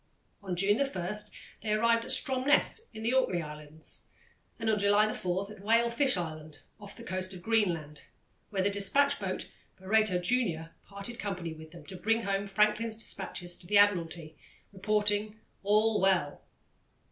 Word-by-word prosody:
On 190 -3 -4
June 200 +6 +2
1 210 -8 -2 0.5
they 210 -1 -1
arrived 230 +1 +2
at - - -9
Stromness 275 - +2
in 220 - -8
the 230 +3 +1
Orkney 185 -10 +1
Islands, 150 +1 -8 0.5
and 225 - -4
on 215 -1 +2
July 205 +2 +4
4 185 +3 -3
at 210 - -12
Whale 230 +3 +3
Fish 260 -2 +2
Island, 155 -3 -6 0.2
off 205 -1 -10
the 230 - -10
coast 185 -2 -3
of 175 - -11
Greenland, 170 -10 0 0.4
where 195 -3 -1
the 200 - +1
despatch 275 +9 +3
boat 190 -2 -4 0.3
Barreto 205 0 +2
Junior 175 -5 0 0.2
parted 200 +5 -7
company 180 -5 -4
with 160 0 -12
them 165 -2 -13
to 190 - -9
bring 225 +4 0
home 200 0 -1
Franklin's 210 +2 +1
despatches 175 -5 -2
to 175 - -13
the 205 +2 +3
Admiralty, 170 -6 +2 0.4
reporting 210 +1 0 0.2
"All 215 +1 +2
Well." 185 -7 +1
200 Hz, 160 wpm, -30 LUFS, 175-220 Hz, 0.5 s, July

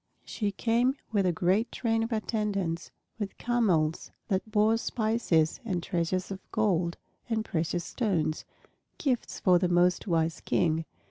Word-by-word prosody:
She 205 -2 -2
came 240 +5 +2 0.2
with 200 -4 +2
a - - +3
great 185 +7 +1
train 225 -2 0
of 225 +2 -2
attendants, 205 -6 -1 0.3
with 200 -2 -4
camels 185 -10 +1 0.2
that 195 +2 0
bore 215 +1 +3
spices 220 -9 +1
and 185 -7 -2
treasures 180 +1 -1
of 190 - -4
gold 180 -6 +1 0.3
and 220 -1 0
precious 170 -2 -1
stones, 175 -10 -1 0.5
gifts 255 -5 -1
for 180 -2 +5
the 180 -1 +1
most 175 +3 +3
wise 165 -2 +1
King. 160 -1 +1
195 Hz, 140 wpm, -29 LUFS, 170-225 Hz, 0.5 s, for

